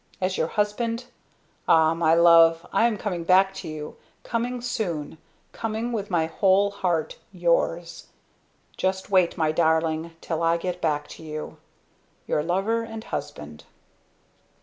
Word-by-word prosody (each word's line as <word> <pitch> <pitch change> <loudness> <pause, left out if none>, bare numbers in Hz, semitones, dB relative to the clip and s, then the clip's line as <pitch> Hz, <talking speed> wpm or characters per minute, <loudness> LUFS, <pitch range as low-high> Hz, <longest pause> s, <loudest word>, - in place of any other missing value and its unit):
As 185 0 -1
your 160 - 0
husband! 230 +5 -1 0.6
Ah! 160 0 +5
my 165 -1 +3
love! 165 -1 +6
I 230 - +4
am 225 -3 -2
coming 180 -5 -3
back 190 +2 +4
to 190 - -8
you 155 -1 -7 0.3
coming 245 +1 -2
soon, 175 - -4 0.3
coming 225 +1 -3
with 210 -3 -3
my 170 -3 +1
Whole 195 +4 +2
Heart, 175 -5 -2
Yours! 170 -2 -1 0.7
Just 190 +1 -2
wait, 185 -2 +3
My 160 -2 +1
Darling, 160 0 0
till 165 -1 -3
I 165 0 +2
get 180 +1 -4
back 150 -2 0
to - - -11
you! 155 -1 -7 0.7
"Your 150 - 0
Lover 195 +8 0
and 225 -1 -7
Husband." 75 - -7
175 Hz, 140 wpm, -25 LUFS, 160-205 Hz, 0.7 s, love